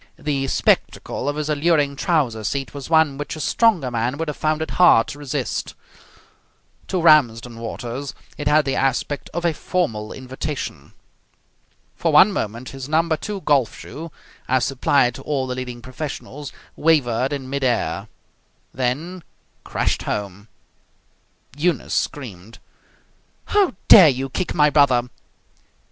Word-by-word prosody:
The 140 -2 -2
spectacle 135 - 0
of 145 - -2
his 150 0 -3
alluring 150 -1 +1
trouser 135 -8 0
seat 135 +5 -3
was 140 0 -8
one 160 -4 +3
which 145 +2 -4
a - - -8
stronger 165 - +2
man 120 +3 -1
would 165 0 -3
have 150 - -4
found 155 0 0
it - - -6
hard 175 -11 +5
to 145 - -8
resist. 145 -3 -3 1.1
To 185 - -1
Ramsden 120 -8 +3
Waters 120 +4 -6 0.2
it 145 - -4
had 150 +1 +4
the 135 - -1
aspect 135 +2 -1
of 175 +1 -3
a 170 - +2
formal 115 - -2
invitation. 130 +2 -6 1.0
For 165 - 0
one 170 +7 +7
moment 115 - -4
his 135 0 -8
number 160 +1 +2
II 200 -2 -4
golf 140 -8 +1
shoe, 165 +2 -9 0.4
as 130 -1 +2
supplied 130 -1 +2
to 135 - -9
all 135 -2 -1
the 130 - -3
leading 125 -2 -6
professionals, 145 +1 -7 0.2
wavered 135 -5 +2
in 140 -2 -4
mid 140 +1 -3
air, 110 -6 0 0.7
then 150 +9 -2 0.4
crashed - - -1
home. 100 0 -4 1.1
Eunice 165 +3 -1
screamed. 115 -6 -4 0.9
"How 405 - +2
dare 180 -7 +10
you 135 0 -2
kick 185 +3 -3
my 150 -2 +4
brother!" 125 -5 +3
140 Hz, 140 wpm, -21 LUFS, 125-155 Hz, 1.1 s, dare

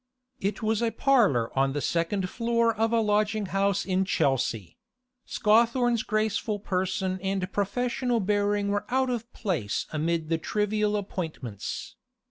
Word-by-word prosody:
It 200 +2 -2
was 220 +1 +1
a 230 - +2
parlour 220 - +2
on 135 0 +2
the 145 - -1
second 170 +5 0
floor 230 +2 +1
of 225 +1 0
a 230 - +3
lodging 210 0 +1
house 200 0 +1
in 190 0 +1
Chelsea; 120 - 0 0.5
Scawthorne's 235 +1 +3
graceful 215 0 -1
person 185 -1 -1
and 190 -1 -2
professional 240 +4 0
bearing 205 0 +1
were 205 0 -1
out 260 0 +1
of 235 0 -4
place 155 - -2
amid 160 +1 -1
the 165 -1 +1
trivial 210 +3 0
appointments. 160 - -5
205 Hz, 135 wpm, -27 LUFS, 185-225 Hz, 0.5 s, a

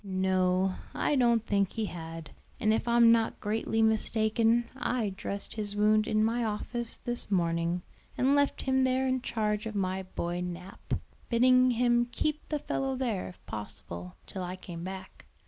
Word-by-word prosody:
"No, 185 -1 +1 0.2
I 295 - +1
don't 235 -3 +3
think 200 -2 +1
he 225 -1 -1
had; 165 -4 -7 0.3
and 215 0 +3
if 225 - -1
I'm 235 -1 +6
not 230 -1 +2
greatly 220 +1 0
mistaken 225 +1 +2
I 245 -4 -1
dressed 200 +1 -4
his 210 -2 -1
wound 215 +1 +3
in 215 0 +2
my 235 +2 0
office 230 +2 -2
this 240 -2 -4
morning, 170 -1 0 0.3
and 265 +2 +3
left 285 0 +2
him 265 0 +2
there 260 0 +2
in 260 -1 0
charge 215 -2 -1
of 220 - -6
my 190 -1 -1
boy 175 -1 -4
Nap, 180 +2 -5 0.3
bidding 255 +1 +5
him 240 0 +3
keep 305 +3 -2
the 300 - 0
fellow 270 -2 -2
there, 240 -7 -2
if 180 - -13
possible, 90 -4 -7
till 190 - -6
I 180 0 -4
came 175 -2 -8
back. 190 +1 -8
215 Hz, 165 wpm, -30 LUFS, 185-240 Hz, 0.3 s, I'm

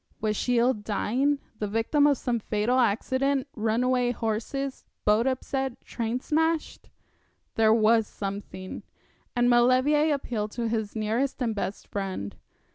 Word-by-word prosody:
Was 215 0 0
she 245 +3 +1
ill 245 +2 +4
dying, 230 +7 0 0.2
the 210 - -1
victim 225 +8 +2
of 285 -2 +3
some 240 -1 -1
fatal 215 +4 0
accident, 260 +5 +1
runaway 245 +3 +1
horses, 245 +4 -3 0.2
boat 215 +4 +3
upset, 265 0 -2
train 235 +1 -2
smashed? 320 +3 -1 0.6
There 220 -1 +4
was 220 0 +4
something; 195 -2 -6 0.5
and 245 0 +3
Maulevrier 255 +6 +4
appealed 225 -7 -2
to 235 -1 -2
his 220 -2 -2
nearest 225 +6 -1
and 235 -4 0
best 200 -1 -4
friend. 185 - -4
235 Hz, 130 wpm, -27 LUFS, 215-260 Hz, 0.6 s, ill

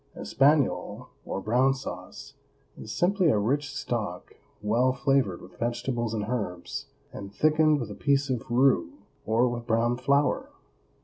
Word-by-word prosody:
ESPAGNOLE, 140 0 +1 0.2
or - - -3
brown 125 +6 +2
sauce, 90 -9 -8 0.4
is 110 - -9
simply 185 - +2
a 125 - +3
rich 140 +7 0
stock 110 -9 -4 0.3
well 120 +5 +2
flavored 130 -8 0
with 90 -1 -15
vegetables 120 -1 -2
and 105 -2 -2
herbs, 100 -8 -4 0.3
and 100 -1 -8
thickened 155 +4 +3
with 115 -5 -5
a - - -5
piece 140 +4 +1
of 125 -4 -3
roux 135 - +3 0.3
or 115 +3 +3
with 120 -1 -4
brown 115 +1 +2
flour. 140 +2 +1
125 Hz, 140 wpm, -27 LUFS, 110-140 Hz, 0.4 s, a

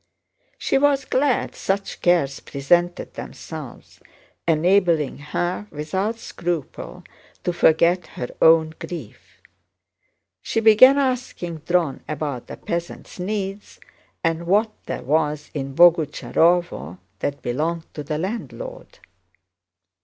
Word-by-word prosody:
She - - +1
was 280 -1 +3
glad 265 -1 +1
such 195 +1 -3
cares 170 -6 +2
presented 175 +6 0
themselves, - - -9 0.5
enabling 165 -3 +2
her 175 +7 -3
without 190 +9 -2
scruple 170 - -5 0.4
to 175 - 0
forget 170 +1 +3
her 125 - -3
own 160 -1 +6
grief. 175 - -9 1.0
She 225 - -1
began 225 +5 +7
asking 250 - -2
Dron 165 -3 0
about 145 -4 -4
the - - -8
peasants' 170 +2 -5
needs 195 +1 -4 0.4
and 165 +1 0
what 210 +4 +3 0.2
there - - -4
was 150 +1 0
in 135 -2 -4
Boguchárovo 165 - +3 0.2
that 140 0 -3
belonged 160 +7 -2
to 150 - -5
the 150 +1 -3
landlord. - - -6
170 Hz, 105 wpm, -22 LUFS, 155-200 Hz, 1.0 s, began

